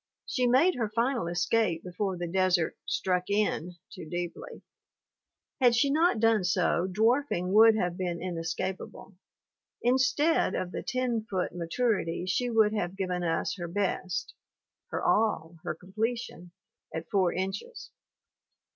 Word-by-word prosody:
She 250 -1 0
made 265 +10 +4
her 230 -7 -2
final 230 -1 0
escape 175 0 +1
before 185 +1 -3
the 175 - -3
desert 180 -1 +1
"struck 180 0 0
in" 200 -4 0 0.2
too 175 -6 -9
deeply; 175 -1 -6 1.0
had 245 -3 +5
she 275 +4 +3
not 315 -4 +3
done 225 -3 +3
so 180 -1 +1
dwarfing 220 -3 +1
would 220 +1 +7
have 180 -4 -1
been 175 -2 -2
inescapable; 180 +3 -4 0.7
instead 260 - +2
of 180 -1 -3
the - - -4
ten 255 -3 -1
foot 185 -2 -2
maturity 175 0 -1
she 205 +7 0
would 220 -2 +3
have 190 -3 -2
given 180 -2 -2
us 165 -2 -1
her 175 -2 -4
best 185 0 -2 0.5
her - - -4
all, 170 -7 +1
her - - -3
completion 200 0 -4 0.4
at 165 +1 -5
four 190 -4 +3
inches. 195 - -5
190 Hz, 135 wpm, -29 LUFS, 175-230 Hz, 1.0 s, would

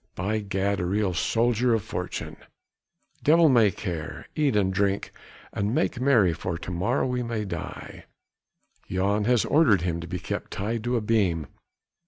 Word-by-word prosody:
By 105 +5 -1
Gad! 100 -1 -1
a 90 - -1
real 100 0 0
soldier 120 +5 +2
of 110 - -2
fortune! - - -5 0.8
devil 165 +1 +5
may 115 -5 +5
care! 85 -4 -6
eat 145 -6 +1
and 95 -2 +2
drink 100 0 0 0.4
and 100 +4 -1
make 125 - 0
merry 115 -10 +4
for 85 +2 -4
to 85 - -7
morrow 105 +9 0
we 125 -1 -1
may 115 -3 -3
die. 95 - -7 0.8
Jan 100 +3 0
has 120 -1 +3
ordered 135 - +4
him 85 -1 -1
to 85 - -7
be 90 +1 -4
kept - - -5
tied 110 +3 -3
to 120 0 +1
a - - -1
beam! 100 -8 +1
105 Hz, 165 wpm, -26 LUFS, 95-120 Hz, 0.8 s, devil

